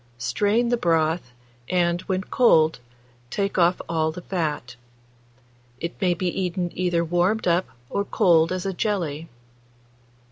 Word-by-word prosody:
Strain 205 - +1
the 240 - +2
broth, 165 - +1 0.4
and, 175 -1 +1
when 190 0 0
cold, 160 - +3 0.5
take 200 +5 -1
off 175 +1 +3
all 160 -1 0
the 175 +2 -9
fat. 150 -9 -3 1.0
It 170 +1 -4
may 180 -2 +2
be 180 +2 -2
eaten 180 -1 -2
either 175 -2 0
warmed 180 +6 +1
up 175 +2 +2 0.2
or 200 - -1
cold 165 -4 +3
as 185 0 -3
a 195 - -1
jelly. 170 -7 -2
175 Hz, 135 wpm, -24 LUFS, 160-190 Hz, 1.0 s, cold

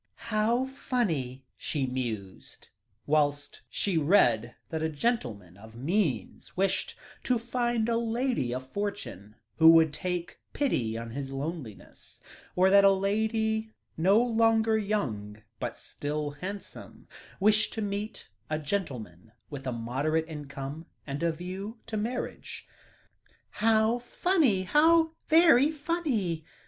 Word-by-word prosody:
"How 225 +4 +2
funny," 165 - -2
she 145 -4 -2
mused, 115 -7 -5 0.4
whilst 145 -1 0
she 185 -5 0
read 120 - +3
that 160 -1 -3
a 160 - 0
gentleman 120 - -2
of 110 +2 -14
means 140 - -2
wished 195 +1 0 0.3
to 250 - +2
find 240 -1 -1
a 230 -1 +1
lady 235 - 0
of 130 +1 -4
fortune 200 - -5 0.2
who 160 0 +8
would 160 -2 +5
take 180 -1 -4
pity 120 - 0
on 115 0 -6
his 135 +2 -5
loneliness; 135 - -7 0.4
or 185 +1 +4
that 200 0 +7
a 195 - +8
lady 220 +3 0 0.3
no 190 +6 +4
longer 225 -2 +3
young, 110 - -2 0.2
but - - -4
still 150 0 -4
handsome, 190 +7 -8 0.3
wished 215 +2 +4
to 220 - -3
meet 205 +2 -4 0.2
a 155 - 0
gentleman 125 - -4 0.2
with 135 -2 -6
a - - 0
moderate 135 +8 -1
income, 145 0 -7 0.2
with 140 0 -4
a 170 0 +2
view 185 +7 -6
to 225 - -5
marriage. 230 +4 -4 0.8
"How 220 +2 +2
funny 255 - +2
how 320 - +4 0.2
very 315 -4 +6
funny!" 285 - -1
185 Hz, 125 wpm, -28 LUFS, 135-225 Hz, 0.8 s, who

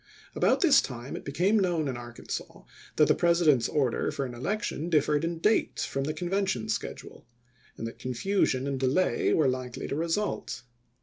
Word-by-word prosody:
About - - +2
this 305 -7 +6
time 125 0 -6
it - - -7
be 140 - -5
came 190 +9 +3
known 175 -6 +1
in 130 - -2
Arkansas 120 0 -7 0.3
that - - +5
the - - +5
President's 170 -8 +3
order 135 -6 0
for 140 - -3
an 125 - -6
election 170 - -3
differed 150 -2 +2
in 165 0 -2
date 210 +7 +1
from 135 0 -2
the 155 - -2
Convention 180 - -1
schedule; 110 - -5 0.5
and - - -5
that 115 - -7
confusion 130 +1 0
and 140 -1 -2
delay 135 +8 +2
were 155 -4 +3
likely 130 -1 -3
to - - -3
result. 165 -4 -2
145 Hz, 175 wpm, -28 LUFS, 130-175 Hz, 0.5 s, this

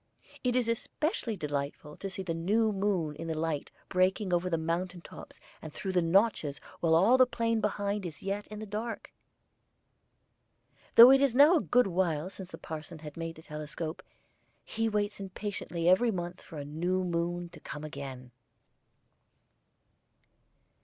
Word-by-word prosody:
It 250 -1 +1
is 250 -2 +2
especially 230 - -2
delightful 145 -1 -4
to 195 - -5
see 190 0 -5
in - - -16
the 165 - -1
new 210 +7 +2
moon 190 -6 0
the 165 -1 -3
light 155 -2 -2 0.2
breaking 185 +1 +1
over 175 +1 +1
the 165 - +1
mountain 175 +2 -2
tops - - -12 0.2
and 155 - -8
through 190 - -4
the 180 -1 +3
notches 165 -4 +2 0.2
while 160 -1 +3
all 220 +10 +5
the 255 - +7
plain 230 -2 0
behind 205 -1 -1
is 170 -4 -7
yet 200 +1 -3
in 210 - -8
the 215 - -6
dark. 215 +3 -5 1.8
Though 240 +3 +11
it 270 0 +6
is 275 -4 +3
now 295 +6 +8
a - - +1
good 250 0 +3
while 175 -2 0
since 190 -2 -9
the - - -8
parson 160 +1 -7 0.2
made 165 0 -5
the 160 - -14
telescope, 155 +2 -5 0.6
he 225 0 -1
waits 205 -1 -1
impatiently 190 -3 -4
every 190 +7 +5
month 175 -3 -4
for 165 - -11
the 145 - -5
new 175 +5 -1
moon 175 0 -2
to - - -13
come 150 - -8
again. 135 -4 -7
185 Hz, 160 wpm, -30 LUFS, 165-210 Hz, 1.8 s, Though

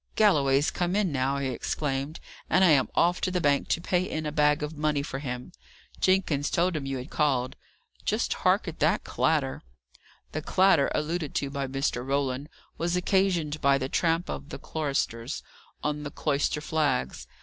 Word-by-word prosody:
"Galloway's 145 -9 +4
come 180 +1 -1
in 205 -5 +1
now," 135 0 0
he 140 -1 -1
exclaimed, 140 +3 -3 0.3
"and 185 +4 +4
I 185 - +6
am 140 -4 +4
off 175 +1 +3
to - - +1
the 180 0 0
bank 145 -4 +2
to - - +1
pay 180 +1 +1
in 155 -4 -3
a 150 - -2
bag 150 0 +2
of 150 +2 -4
money 150 -1 0
for 135 - -5
him. 125 +2 -5 0.5
Jenkins 180 -7 +2
told 175 +1 +1
him 140 -3 -3
you 135 -1 -2
had 125 - -8
called. 130 -4 +1 0.5
Just - - 0
hark - - +2
at - - -6
that - - +2
clatter!" 65 +1 0 0.7
The 155 - -3
clatter, 185 -3 +4
alluded 155 0 -2
to 140 -1 -1
by 140 -1 -2
Mr. 135 -2 -1
Roland, 135 +1 -1 0.3
was 170 +1 0
occasioned 180 -5 +1
by 140 0 +4
the 130 0 -3
tramp 165 +3 +1
of 145 - -6
the - - -6
choristers 135 -5 -3 0.4
on 150 0 -1
the 145 - -5
cloister 145 0 0
flags. 145 - -1
150 Hz, 180 wpm, -27 LUFS, 135-170 Hz, 0.7 s, I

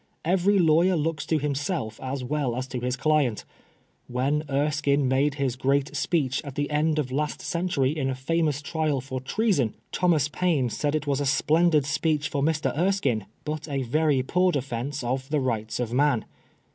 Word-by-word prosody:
Every 190 +4 +3
lawyer 170 +1 +4
looks 155 -1 -2
to 160 - +2
himself 140 - -2
as 130 0 -4
well 135 -2 -1
as 130 +1 -3
to 125 - -3
his 125 +1 -1
client 140 -5 +1 0.6
When 135 +5 0
Erskine 145 0 +1
made 135 +2 +2
his 135 -4 -1
great 135 +2 0
speech 140 -7 0
at 140 -3 -8
the 145 0 -2
end 155 +1 +1
of 135 -4 -1
last 150 +3 -1
century 170 -5 0
in 135 -4 -1
a 130 - -2
famous 150 +1 0
trial 155 -2 0
for 130 0 -5
treason, 145 - 0 0.2
Thomas 165 -6 +2
Paine 150 -7 0
said 150 +4 -1
it 150 -1 -1
was 140 -1 0
a - - 0
splendid 155 +2 +3
speech 150 +1 0
for 140 - -2
Mr. 155 +1 0
Erskine, 150 - 0 0.2
but 155 0 -4
a 135 -2 -1
very 145 +1 +1
poor 180 +6 +2
defence 135 -1 -3
of 130 +2 -2
the 150 0 +1
Rights 115 -4 -2
of 120 -1 -2
Man." 140 -3 +2
145 Hz, 180 wpm, -26 LUFS, 130-155 Hz, 0.6 s, lawyer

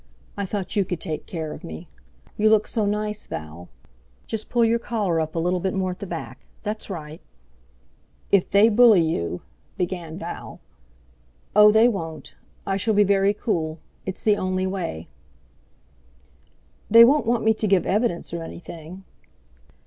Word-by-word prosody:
I 200 -1 -3
thought 200 -1 -4
you 200 - +3
could 180 -2 -4
take 155 -4 -5
care 160 -3 -5
of - - -11
me. 80 -1 -8 0.5
You 215 +1 +3
look 215 -1 +4
so 215 -3 -1
nice, 210 0 -2
Val. 80 +3 -8 0.6
Just 220 -1 -5
pull 235 -1 +3
your 230 +1 +2
coat - - -19
collar 200 -8 0
up 155 +1 -4
a - - -2
little 180 +2 0 0.2
more 185 -1 0
at 180 - -9
the 200 - -6
back—that's 175 - -7
right." 160 -4 -7 1.1
"If 200 -3 +3
they 200 +3 +6
bully 220 -5 +6
you...." 90 - -2 0.4
began 175 -3 -3
Val. - - -7 1.0
"Oh! 210 0 +8
they 220 +2 +6
won't. 165 -9 -4 0.3
I 195 0 0
shall 215 +2 +1
be 205 - +6
very 200 0 +2
cool. 160 -8 -2 0.3
It's 190 - -6
the 210 -1 +3
only 185 0 -1
way." 175 - -4 1.8
"They 230 +2 +9
won't 270 -1 +3
want 235 -1 +1
me 220 0 +4
to 215 0 -2
give 195 -2 +3
evidence 205 -5 -1
or 170 - -3
anything?" 170 +2 -9
195 Hz, 160 wpm, -23 LUFS, 165-215 Hz, 1.8 s, They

